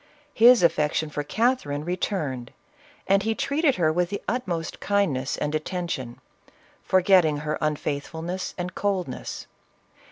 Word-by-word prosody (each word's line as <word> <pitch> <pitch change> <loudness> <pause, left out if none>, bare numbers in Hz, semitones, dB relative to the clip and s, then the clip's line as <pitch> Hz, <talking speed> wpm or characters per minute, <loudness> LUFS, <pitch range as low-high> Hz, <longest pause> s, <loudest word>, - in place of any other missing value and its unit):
His 240 -3 +7
affection 155 -1 +1
for 145 - -2
Catherine 150 - 0
returned, 155 -8 -2 0.6
and 195 +1 +3
he 220 +2 -1
treated 280 +2 +1
her 155 -3 +2
with 175 +1 +1
the 200 - -3
utmost 185 -9 -3
kindness 170 -11 0
and 150 0 -2
attention, 155 -6 -3 0.6
forgetting 185 -5 +4
her 155 0 -2
unfaithfulness 155 +4 -3
and 180 0 -4
coldness. 190 -9 -3
175 Hz, 120 wpm, -25 LUFS, 150-200 Hz, 0.6 s, His